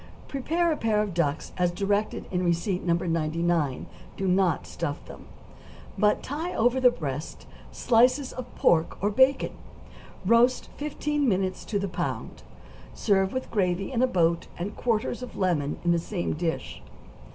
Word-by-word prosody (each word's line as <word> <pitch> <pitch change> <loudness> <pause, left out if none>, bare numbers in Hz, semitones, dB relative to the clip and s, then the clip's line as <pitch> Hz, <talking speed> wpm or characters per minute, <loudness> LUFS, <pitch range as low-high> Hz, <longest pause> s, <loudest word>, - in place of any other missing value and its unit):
= - - -20
Prepare 330 +5 0
a 305 - 0
pair 215 -2 +1
of 205 -4 -4
ducks 160 -3 -1
as 180 -1 +3
directed 200 +4 -1
in 180 -1 0
receipt 175 +2 0
No. 170 -1 +2
99; 165 -3 0 0.3
do 195 - -1
not 185 0 +2
stuff - - -4
them, - - -12 0.7
but 210 -1 +2
tie 315 +6 -4
over 245 +3 +3
the 250 - +8
breasts 150 - -5 0.3
slices 255 +3 +3
of 255 -1 -6
pork 160 -1 +2
or 205 +2 +1
bacon; 260 +5 +3 0.7
roast 235 +5 +3
fifteen 295 -1 -1
minutes 185 -2 -1
to 210 - -1
the 200 0 -1
pound; 180 - -4 0.5
serve 195 -2 +2
with 260 0 -4
gravy 190 -1 0
in 245 -2 0
a 255 - +4
boat 170 -6 +1
and 190 +5 -4
quarters 235 +1 -1
of 250 - -8
lemon 160 -7 0
on 175 - +4
the 170 - +3
same 175 +1 -3
dish. 165 +1 -3
195 Hz, 160 wpm, -27 LUFS, 175-245 Hz, 0.7 s, the